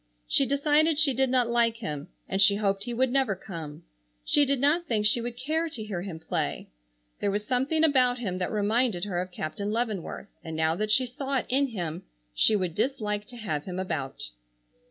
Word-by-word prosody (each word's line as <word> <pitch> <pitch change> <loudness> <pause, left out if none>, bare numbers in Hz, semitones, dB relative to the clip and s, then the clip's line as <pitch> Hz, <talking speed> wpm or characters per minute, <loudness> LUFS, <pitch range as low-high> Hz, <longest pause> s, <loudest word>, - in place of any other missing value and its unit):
She 275 - +3
decided 295 +3 +3
she 295 -3 +4
did 265 +1 +2
not 250 -2 +2
like 235 -1 +2
him, 150 -10 -5 0.2
and 195 +1 0
she 200 0 +7
hoped 200 -1 0
he 240 - -4
would 260 +1 +2
never 265 -6 +2
come. 165 -6 -8 0.4
She 290 - +5
did 275 -1 +1
not 300 +6 +3
think 220 -7 0
she 225 +3 +4
would 240 0 -5
care 315 +6 -1
to 240 -8 -5
hear 200 -5 -4
him 180 -3 -6
play. 160 - -3 0.5
There 205 - 0
was 205 +1 -2
something 265 +7 +1
about 255 -5 +4
him 190 -7 -3
that 180 - -2
reminded 215 -1 +1
her 180 -3 -2
of 185 - -5
Captain 190 +5 -4
Leavenworth, 215 -4 -4
and 160 -2 -6
now 160 0 +2
that 215 +4 -2
she 255 +4 +4
saw 270 +2 -3
it - - -2
in 275 +2 +2
him 175 -7 -4 0.3
she 215 - +4
would 185 -4 -1
dislike 210 -2 -1
to 245 - -11
have 155 -10 -3
him 180 -1 -5
about. 155 - -3
220 Hz, 205 wpm, -27 LUFS, 185-260 Hz, 0.5 s, she